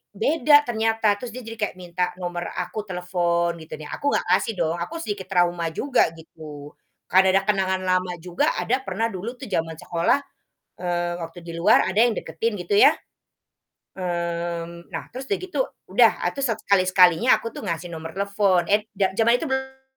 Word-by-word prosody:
beda 295 +6 +4
ternyata, 225 -2 +1
terus 250 - -6
dia 255 - -7
jadi 225 0 -7
kayak 210 -3 -2
minta 180 0 -3
nomor 175 -1 -4
aku, 215 - -3
telepon 175 -1 0
gitu 160 - -8
nih. 150 - -9
Aku 285 - -3
nggak - - +1
kasih 225 - -1
dong, 165 -1 0
aku 175 - -4
sedikit 200 -3 -5
trauma 175 -2 +1
juga 255 - +1
gitu, 150 -2 -11 0.4
karena 190 +1 +6
ada - - +2
kenangan 190 -2 +1
lama 185 0 +1
juga 180 -1 +1
ada 255 +3 0
pernah 225 - -1
dulu 215 +6 -5
tuh 265 - -8
zaman 165 -2 -1
sekolah, 170 +8 +1 0.6
eee, 175 -1 -1
waktu 165 +2 -7
di 170 - -7
luar, 170 +1 +4
ada 190 - -3
yang 240 - +3
deketin 215 +3 -2
gitu 175 +3 -1
ya, - - +8 1.1
mmm, 170 -1 -4
nah, - - -5
terus 265 +1 -7
udah 405 - +1
gitu 370 0 -6 0.3
udah, - - +6 0.2
ah - - +2
tuh 275 - -4
satu 230 -5 -1
kali 200 -2 +4
sekalinya 180 +6 +5
aku 230 - -7
tuh - - -7
ngasih 170 -3 -3
nomor 160 0 -7
telepon. 200 -3 +2
Et 205 +3 +3 0.2
za 190 -1 +1
zaman 235 +3 +3
itu 325 - -4
belum 265 -1 -4
185 Hz, 185 wpm, -24 LUFS, 170-225 Hz, 1.1 s, ya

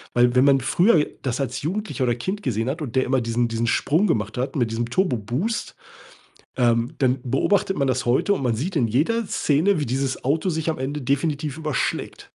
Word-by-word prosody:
Weil 120 0 +4
wenn 130 +2 +5
man 135 -1 +5
früher 170 - +3 0.2
das 130 0 -2
als 135 0 -3
Jugendlicher 175 -4 -2
oder 120 -1 +1
Kind 190 - -4
gesehen 115 -2 -1
hat 155 +4 -4
und 130 -4 -5
der 130 - +3
immer 130 -1 +1
diesen 115 +1 0
diesen 115 0 -1
Sprung 165 - +2
gemacht 110 +1 -1
hat 135 +3 -2
mit 120 -4 0
diesem 115 +1 -2
Turbo 165 -1 +1
Boost, 130 - -3 0.8
ähm, 120 +3 +1
dann 130 -1 +1
beobachtet 190 +10 +1
man 140 - +1
das 125 -1 -1
heute 130 +11 +2
und 140 - -4
man 120 -3 0
sieht 175 - -3
in 120 -7 +2
jeder 195 - +1
Szene, 160 +5 +1
wie 145 - -1
dieses 130 +2 -2
Auto 155 +7 +1
sich 160 0 -2
am 155 - -4
Ende 145 +3 -3
definitiv 145 +2 -1
überschlägt. 155 -6 -2
135 Hz, 210 wpm, -23 LUFS, 120-160 Hz, 0.8 s, wenn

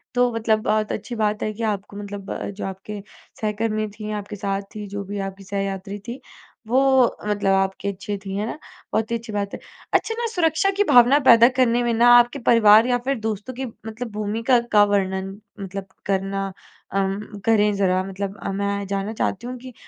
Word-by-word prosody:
तो 245 0 +3
मतलब 220 -1 +1
बहुत 215 0 +1
अच्छी 240 +3 -5
बात 210 -1 0
है 215 - -1
कि 225 +2 -6
आपको 200 0 -6
मतलब 205 -1 -7
अ, - - -4
जो 200 +1 -6
आपके 195 +2 -6 0.4
सहकर्मी 215 0 -1
थीं 215 0 -5
आपके 205 +1 -8
साथ 195 0 -2
थी 210 -1 -5
जो 200 0 -3
भी 205 0 -3
आपकी 195 +1 -14
सहयात्री 195 0 -4
थी 240 +3 -5 0.5
वो 250 +4 +3 0.5
मतलब 205 -2 +1
आपके 195 +1 -1
अच्छे 200 +1 -4
थी, 195 0 -4
है 210 - -1
ना? 230 - -5 0.4
बहुत 220 +1 0
ही - - +1
अच्छी 230 -1 -10
बात 200 -1 -2
है। - - -5 0.3
अच्छा 450 - +2
ना 475 - -1
सुरक्षा 335 -1 +2
की - - +6
भावना 250 +3 +7
पैदा 230 0 +9
करने 240 -1 +3
में 240 -1 +1
ना 235 +2 +4
आपके 240 +3 +3
परिवार 220 0 +7
या 245 -1 +2
फिर 275 -2 0
दोस्तों 220 +3 -4
की 265 +2 -4
मतलब 225 0 -7
भूमिका 220 +4 +1 0.2
का 205 - +8
वर्णन 190 -1 0 0.3
मतलब 195 0 -6 0.2
करना 195 0 -1
अ, 195 +1 -7 0.5
करें 210 -2 +4
ज़रा 185 -1 +2
मतलब 195 +1 -5
अ, - - -2
मैं 200 0 -2
जानना 200 +2 -2
चाहती 220 +1 -2
हूँ 250 0 -5
कि 255 +1 -10
210 Hz, 195 wpm, -23 LUFS, 195-230 Hz, 0.5 s, पैदा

